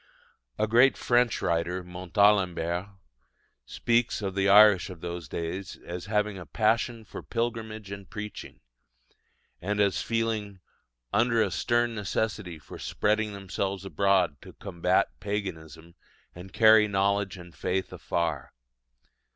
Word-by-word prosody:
A 110 - +2
great 120 +5 +4
French 120 -1 +1
writer, 85 +2 -1
Montalembert, 90 -1 +1 0.8
speaks 115 -2 0
of 95 -1 -2
the 100 +1 +1
Irish 105 -2 +7
of 90 -3 -10
those 85 -4 -6
days 90 +3 -5
as 90 +2 -6
having 105 -2 0
a 90 - -9
"Passion 115 +1 0
for - - -8
pilgrimage 110 -3 -4
and 100 -1 -8
preaching," 105 0 -8 1.0
and 105 +3 -2
as 100 -4 +2
feeling 110 -4 -2 0.5
"under 115 +1 +3
a 100 - -2
stern 120 +3 +1
necessity 105 -4 -3
of - - -9
spreading 105 0 0
themselves 100 0 -4
abroad 95 -6 +1
to - - -13
combat 90 0 0
paganism, 85 -5 -5 0.4
and 90 +2 -11
carry 110 -1 +6
knowledge 100 -1 0
and 85 -1 -12
faith 95 +6 -2
afar." 80 -5 -3
100 Hz, 125 wpm, -27 LUFS, 90-110 Hz, 1.0 s, Irish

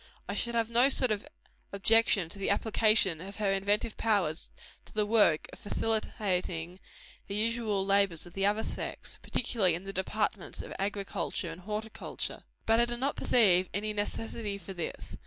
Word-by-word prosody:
I - - -2
should 235 0 -2
have 230 0 0
no 245 +4 +5
sort 255 -3 +3
of 215 +6 -2 0.4
objection 200 -2 +3
to 200 - -9
the 195 - -1
application 210 -4 +3
of 195 +2 -8
her 205 -2 0
inventive 205 +3 0
powers 195 -8 +1 0.4
to - - -16
the 210 -1 +2
work 205 -8 +4
of - - -11
facilitating 185 -5 -1 0.5
the 200 - -4
usual 215 -2 0
labors 195 -4 +2
of 175 - -13
the 195 - -2
other 210 +2 +1
sex - - -5
particularly 210 -8 +1
in 175 - -6
the 195 0 -6
departments 195 0 -2
of - - -8
agriculture 195 -4 -2
and 165 +2 -10
horticulture. 215 +3 -4 0.2
But 225 +1 +4
I 235 - +5
do 240 0 -2
not 270 +3 0
perceive 185 -6 +4
any 215 +1 -2
necessity 210 0 -3
for 195 0 -9
this. 175 -3 -5
205 Hz, 170 wpm, -30 LUFS, 190-225 Hz, 0.5 s, no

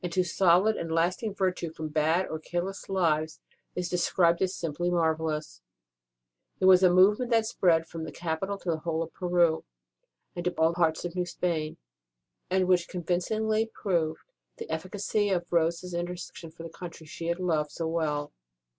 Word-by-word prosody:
ROSE 175 -1 -3
OF - - -6
LIMA 185 - +5
solid 185 +4 +4
and 165 - -4
lasting 180 +6 0
virtue 185 -3 -1
from 160 -1 -5
bad 160 +4 +2
or 160 - -5
careless 175 +5 -4
lives 160 -5 +1 0.4
is 180 -1 -2
described 175 -1 +2
as 190 0 +1
simply 170 +2 -2
marvellous; 160 - -1 0.9
and - - -7
it - - +5
was 185 -1 +8
a 185 - +6
movement 205 +7 +4
that 225 -2 +3
spread 170 -6 +2
from 165 0 -7
the 160 - -6
capital 175 +5 -3
to 180 -3 -2
the 160 - -2
whole 165 0 -1
of 165 - -10
Peru 175 -3 +2 0.7
and 175 - -4
to 180 - +2
all 160 +1 +3
parts 165 -1 +1
of 175 0 -5
New 180 -1 -1
Spain, 165 -3 -2 0.7
and 185 0 +2
which 180 -2 +3
convincingly 215 +5 0
proved 170 -7 -1 0.3
the 455 - -7
efficacy 205 +2 -1
of 175 -2 -1
Rose 170 +1 +2
s 180 -1 -7
intercession 175 -1 -5
for 165 +1 -11
the 165 - -6
country 170 -2 -9
she 165 +2 -6
had 170 +1 -1
loved 160 -5 0
so 165 +2 -4
well. 150 -3 -1
175 Hz, 180 wpm, -28 LUFS, 160-185 Hz, 0.9 s, was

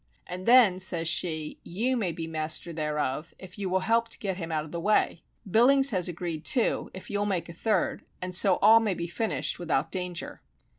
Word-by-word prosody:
And 185 +2 -7
then, 230 -7 +6
says 175 -3 +1
she, 160 -2 0
_you 235 +9 -1
may 205 -8 -1
be 165 0 -6
master 160 +1 -2
thereof, 150 -1 -3
if 190 +2 -12
you 195 -2 -3
will 185 +1 0
help 230 +3 +1
to - - -1
get 190 -3 -4
him 165 -3 -6
out 155 -1 -2
of 155 - -13
the 170 - -4
way. 200 -3 +1 0.3
Billings 265 +7 +5
has 185 -4 +1
agreed 170 -2 -5
too, 240 - +1
if 185 - -10
you'll 205 0 -1
make 180 -4 -2
a - - -8
third, 200 +2 -1 0.2
and 180 0 -4
so 190 +1 +4
all 220 +2 +8
may 215 -4 -1
be 170 - -4
finished 210 +4 -2
without 165 -3 -1
danger. 180 -2 -4
180 Hz, 205 wpm, -27 LUFS, 165-210 Hz, 0.3 s, all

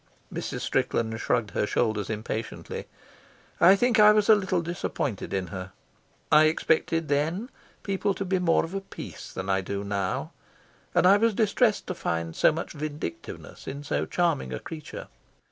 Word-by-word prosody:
Mrs. - - -4
Strickland 110 -1 0
shrugged 105 -4 0
her 105 - 0
shoulders 110 -3 0
impatiently. 110 +1 -4 0.7
I 190 +3 +8
think 240 +2 +2
I 210 0 +9
was 210 0 +2
a - - +10
little 185 -4 0
disappointed 160 - -3
in 95 -1 -1
her. 95 0 -6 0.6
I 155 +1 +7
expected 160 +1 +1
then 160 - 0 0.3
people 195 0 0
to 195 - -3
be 190 0 +1
more 165 -2 +3
of 165 - -9
a 195 - -2
piece 195 - -9
than 95 - -5
I 95 0 +2
do 100 +1 -4
now, 100 -2 -2 0.6
and - - +4
I 195 +2 +7
was 225 0 +2
distressed 220 +1 +2
to - - -3
find 85 - -3
so - - +5
much 165 +2 -5
vindictiveness 150 - -6
in 140 +2 -5
so - - -1
charming 165 - 0
a 65 - -3
creature. 155 -2 -8
155 Hz, 165 wpm, -27 LUFS, -, 0.7 s, a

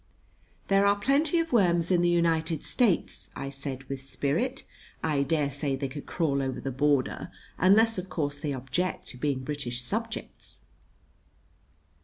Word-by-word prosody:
"There 195 0 +4
are 200 - +5
plenty 285 +9 +2
of 330 -4 0
worms 175 -5 +3
in 175 -1 +4
the 175 - +3
United 165 -1 +1
States," 225 -9 0
I 135 0 -5
said 135 -1 -4
with 135 0 -6
spirit. 140 - -1 0.4
"I 150 -3 +1
dare 145 0 +1
say 140 0 -1
they 135 +1 -3
could 145 +2 -8
crawl 145 -5 0
over 130 -1 -2
the 135 - -4
border 140 0 +1 0.3
unless, 215 +3 +5
of 185 +1 -7
course, 145 -4 -2
they 150 -1 -2
object 135 +8 -2
to - - -6
being 135 -1 -1
British 130 -4 -4
subjects." 125 - -5
150 Hz, 155 wpm, -28 LUFS, 135-185 Hz, 0.4 s, are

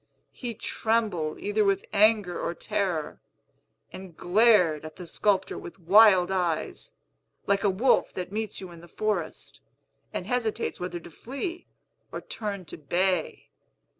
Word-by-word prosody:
He 240 -3 -5
trembled 210 -10 -1
either 205 +1 +1
with 195 -1 +1
anger 210 -3 +3
or 170 - -2
terror, 185 -8 -2 0.7
and 185 -3 -10
glared 180 -6 +4
at 155 0 -9
the 180 - -9
sculptor 195 +2 0
with 175 - -10
wild 190 0 +6
eyes, 180 - -2 0.5
like 200 +1 +1
a 205 - +4
wolf 230 +7 +2
that 180 0 -5
meets 215 0 -3
you 185 -2 -8
in 170 -1 -12
the 170 - -13
forest, 200 -3 -3 0.5
and - - -4
hesitates 235 -3 -1
whether 175 -1 -4
to 170 0 -13
flee 280 - -6 0.4
or - - -4
turn 210 - -5
to - - -9
bay. 175 +3 -1
195 Hz, 140 wpm, -27 LUFS, 175-215 Hz, 0.7 s, wild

